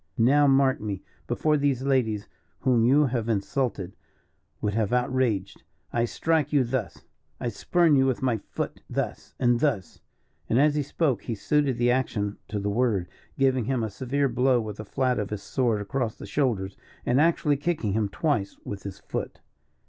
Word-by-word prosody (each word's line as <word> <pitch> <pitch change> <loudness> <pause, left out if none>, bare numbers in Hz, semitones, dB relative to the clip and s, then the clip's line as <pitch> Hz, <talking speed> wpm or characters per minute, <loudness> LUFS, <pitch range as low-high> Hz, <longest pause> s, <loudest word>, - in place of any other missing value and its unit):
"Now 140 +5 +5
mark 135 0 +3
me. 100 -3 -4 0.2
Before 155 -1 +2
these 140 -3 +1
ladies 120 -7 +1 0.3
whom 125 -3 +3
you 140 +5 +5
have 120 -3 -1
insulted, 105 -3 -1 0.6
would 105 -1 -1
have 110 -2 0
outraged, 125 -5 0 0.3
I 120 0 +2
strike 155 +3 0
you 145 -3 +4
thus. 120 -3 -3 0.4
I 120 - -1
spurn 165 - +2
you 135 -1 +4
with 130 0 -1
my 125 -3 +2
foot - - -5
thus - - -4
and 120 -1 +3
thus!" 115 - -1 0.5
and 115 - +3
as 150 +1 +4
he 150 - +1
spoke 140 -2 -1
he 115 - -2
suited 140 +3 +1
the 120 0 +3
action 105 -5 -1
to 105 - -4
the 100 - -3
word, 105 -6 +1 0.3
giving 130 -3 +2
him 125 -1 0
a 110 - -3
severe 135 +6 0
blow 125 0 +2
with 105 -2 -5
the 110 - -7
flat 130 +3 0
of 105 - -2
his 105 -2 -5
sword 120 -6 0
across 115 +2 -2
the - - -9
shoulders, 100 -4 -1 0.3
and 125 +4 +3
actually 155 -2 +3
kicking 145 - -1
him 105 -1 0
twice 130 -4 -1
with 100 -1 -5
his 100 -2 -7
foot. - - -5
125 Hz, 180 wpm, -26 LUFS, 105-135 Hz, 0.6 s, Now